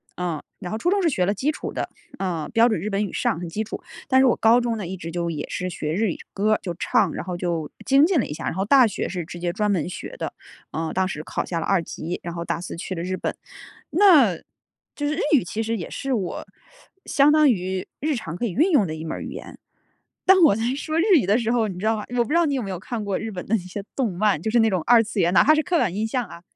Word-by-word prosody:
嗯， 170 -4 -3 0.2
然 180 -2 -6
后 220 - -2
初 350 +10 0
中 400 -1 +2
是 335 - +3
学 185 -10 +1
了 200 - +1
基 260 +9 -1
础 - - -6
的， - - -3 0.3
嗯， 175 -5 -2
标 230 +1 +5
准 215 - 0
日 205 - -4
本 200 +1 0
语 200 - -4
上， 165 - 0
很 175 -2 -5
基 215 +6 -2
础。 220 - -7 0.3
但 260 -1 +5
是 265 - +5
我 - - +4
高 230 +2 +4
中 235 -2 -1
呢， 200 - -4
一 190 +2 -5
直 165 -2 -7
就 170 0 -2
也 155 - -5
是 185 0 -3
学 155 -2 -3
日 200 +2 +1
语 - - -6 0.2
歌 210 +2 +2
儿， - - +1
就 175 -4 -4
唱， - - +1
然 - - -5
后 180 -1 -4
就 170 -4 -3
精 275 +3 +5
进 345 -5 +2
了 - - 0
一 - - -8
下。 150 - -6
然 - - -1
后 190 +2 -1
大 255 +3 +6
学 210 - -2
是 175 -3 -4
直 175 0 -9
接 175 0 -1
专 210 +2 0
门 175 -2 0
学 - - -7
的， - - -4 0.4
呃， 160 0 -3
当 190 0 +1
时 155 -4 -5
考 - - -3
下 170 -2 -3
了 - - -3
二 195 -3 +2
级， 165 +1 -5
然 170 0 -6
后 170 0 -4
大 170 - -2
四 180 - -6
去 185 - -5
了 170 - -4
日 185 +1 -3
本。 - - -3 0.5
那 305 - +5 0.6
就 290 -1 -2
是 300 - 0
日 - - -4 0.2
语， 245 - +3
其 220 +6 -3
实 230 +1 -1
也 170 - -6
是 270 -1 -3
我 190 -7 -3 0.6
相 285 +1 +4
当 305 -2 +5
于 185 -3 -1
日 300 0 0
常 165 -7 -5
可 240 - -2
以 210 - -2
运 315 - +3
用 275 - +4
的 155 - -4
一 160 0 -6
门 160 - -4
语 - - -7
言。 - - -9 0.7
当 380 -1 +6
我 200 - +6
在 225 - -2
说 310 +2 -2
日 - - +3 0.2
语 - - -4
的 210 +3 +4
时 230 -1 0
候， 230 -3 +2
你 185 -3 -6
知 205 - -4
道 225 0 +3
吗？ 210 - -5
我 240 - +4
不 - - -9
知 - - 0
道 340 -2 +4
你 280 - 0
有 250 - -2
没 195 - -5
有 180 - -4
看 220 0 -5
过 195 -2 -1
日 225 - -4
本 180 -4 -6
的 220 - -3
那 200 - -1
些 185 +3 -7
动 245 -7 0
漫， 200 -6 +2
就 220 - -2
是 240 - +2
那 225 - +4
种 185 -3 0
二 235 -1 +7
次 215 -1 -4
元， 175 0 +3
哪 - - +7
怕 310 - +6
是 310 - +3
刻 355 +1 0
板 185 - +1
印 215 +2 -1
象 245 0 -1
啊 170 -2 -12
205 Hz, 325 characters per minute, -23 LUFS, 175-245 Hz, 0.7 s, 二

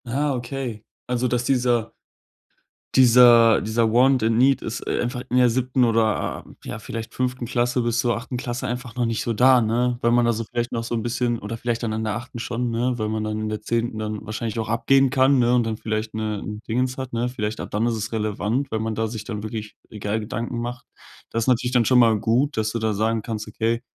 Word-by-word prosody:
Ah, 140 +4 0
okay. 120 -3 -5 0.2
Also, 125 0 0
dass 125 0 0
dieser 120 -3 +1 1.0
dieser 120 -2 +7
dieser 110 0 +1
want 130 +1 +4
and 110 0 +2
need 135 +2 +4
ist 115 - -5
einfach 120 0 -2
in 125 - +1
der 125 -1 +5
7. 125 +1 +1
oder, 115 -2 0 0.2
ja, - - -5
vielleicht 115 +1 -7
5. 125 -1 -2
Klasse 125 +1 0
bis 120 0 0
zur 120 0 +1
8. 125 +2 -6
Klasse 120 0 -3
einfach 125 +1 -5
noch 120 -1 0
nicht 115 -1 -1
so 120 - -2
da, 125 +2 +5
ne? 120 +2 +1
Weil 120 - +2
man 120 0 +4
da 120 - +2
vielleicht 120 +2 -3
noch 115 - -2
so 115 - -5
'n 115 - -1
bisschen 120 0 -1
oder 105 +3 -5
vielleicht 120 +1 -3
dann 110 -2 -1
in 110 0 -2
der 105 -1 -1
8. 120 +1 -9
schon, 120 +1 -2
ne, 120 +2 0
weil 110 -2 -2
man 110 0 -2
dann 110 0 -3
in 110 - -2
der 105 0 -4
10. 115 +1 -1
dann 110 0 -4
wahrscheinlich 110 +1 -4
auch 110 - -2
abgehen 135 +4 +3
kann, 135 0 +4
ne, 120 0 +3
und 115 -2 0
vielleicht, 110 0 -3
ne, 110 -1 -2
'n 105 0 -6
Dingens 125 +3 -1
hat, 130 -2 -6
ne? 120 +1 0
Vielleicht 110 -3 -4
ab - - -7
dann 105 +3 0
ist 120 - 0
es 105 0 -4
relevant, 110 +4 -1
weil 110 - -1
man 110 0 -2
da 110 +1 -1
sich 110 -1 -6
dann 105 -1 -5
wirklich 110 0 -6
egal 105 0 -3
Gedanken 115 +2 -4
macht. 120 +1 -5 0.4
Das 115 0 -1
ist - - -12
natürlich 125 -1 +2
dann 125 -2 +3
schon 130 - +4
mal 115 -3 +5
gut, 120 +7 +1
dass 110 0 0
du 115 - -1
da 110 -1 0
sagen 110 +2 0
kannst, 110 -1 -5
okay, 115 +2 -1
115 Hz, 235 wpm, -23 LUFS, 110-125 Hz, 1.0 s, dieser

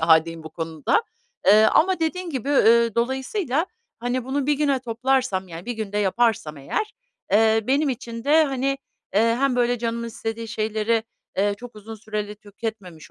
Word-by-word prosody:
hâldeyim 160 0 +3
bu 160 - -9
konuda. 160 - 0 0.4
Iıı, 215 +2 +7
ama 370 +1 +3
dediğin 345 +2 -1
gibi, 270 -1 -4
ııı, 235 -5 +5
dolayısıyla, 265 - 0 0.3
hani, 245 +1 -2
bunu 270 +1 -1
1 295 - +3
güne 280 -2 +1
toplarsam, 245 -5 0
yani, 170 +5 -9
1 245 - -1
günde 210 -2 -3
yaparsam 200 -6 +1
eğer, 140 - -3 0.4
eee, 220 +1 +5
benim 280 +3 +2
için 235 -2 -5
de, 310 +2 +5
hani, 275 -1 -1 0.4
eee, 210 - +5 0.2
hem 275 -2 +2
böyle 245 0 +2
canımın 235 0 -2
istediği 225 0 -5
şeyleri, 220 +1 0 0.3
eee, 205 +1 +2
çok 245 -2 -11
uzun 220 +2 -9
süreli 210 -1 -5
tüketmemiş 205 -5 -8
230 Hz, 160 wpm, -23 LUFS, 210-265 Hz, 0.4 s, Iıı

